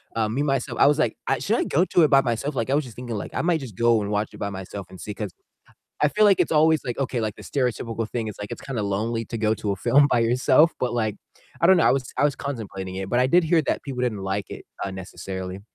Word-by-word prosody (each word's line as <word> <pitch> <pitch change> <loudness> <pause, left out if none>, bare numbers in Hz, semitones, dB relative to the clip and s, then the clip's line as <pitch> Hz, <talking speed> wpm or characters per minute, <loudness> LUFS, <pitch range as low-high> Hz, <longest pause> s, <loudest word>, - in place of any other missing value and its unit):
um, 110 -1 0
me, 135 - 0
myself 135 -3 -1
I 140 - +7
was, 145 - +4
like, 120 -8 +1
"I - - +1
should - - 0
I - - +1
go 175 +6 +2
to 175 -3 +3
it - - +6
by 135 - +6
myself?" 130 +3 -2
Like, 115 -1 -1
I 135 - +1
was 150 - +2
just 120 -4 -11
thinking, 120 -2 -5
like, 100 - -5
I - - -1
might 170 -2 +1
just 125 -8 -9
go 115 0 +3
and 100 - -3
watch 105 0 -1
it - - -10
by 100 - -2
myself 95 0 -7
and 95 - -12
see, 105 - -6
'cause 100 -2 -5 0.7
I 150 - +5
feel 210 +8 +2
like 200 -3 +5
it's - - +1
always, 160 0 +4
like, 120 0 -4
okay, 130 -3 -1
like, 110 -2 -3
the - - -11
stereotypical 115 -4 -2
thing 115 -2 -2
is, 105 - -6
like, 105 0 -6
it's - - -6
kinda 130 -5 -4
lonely 110 +3 -1
to 115 - -5
go 110 0 +2
to 105 - -3
a 100 - -3
film 130 +9 +4
by - - +3
yourself, 130 +7 +4
but, 125 -1 -1
like, 110 -3 -1 0.4
I 170 - +5
don't 190 +1 +7
know. - - +3
I - - +5
was 135 -2 -2
I - - +3
was 145 -1 +1
contemplating 100 -9 -5
it, 95 0 -4
but 120 +4 +2
I 130 - +4
did 175 +5 +4
hear 160 0 +3
that - - -1
people 130 -3 -4
didn't 120 -4 -1
like 95 0 -3
it, - - -8 0.2
uh, 100 - -3
necessarily. 95 0 -6
120 Hz, 295 wpm, -24 LUFS, 105-140 Hz, 0.7 s, I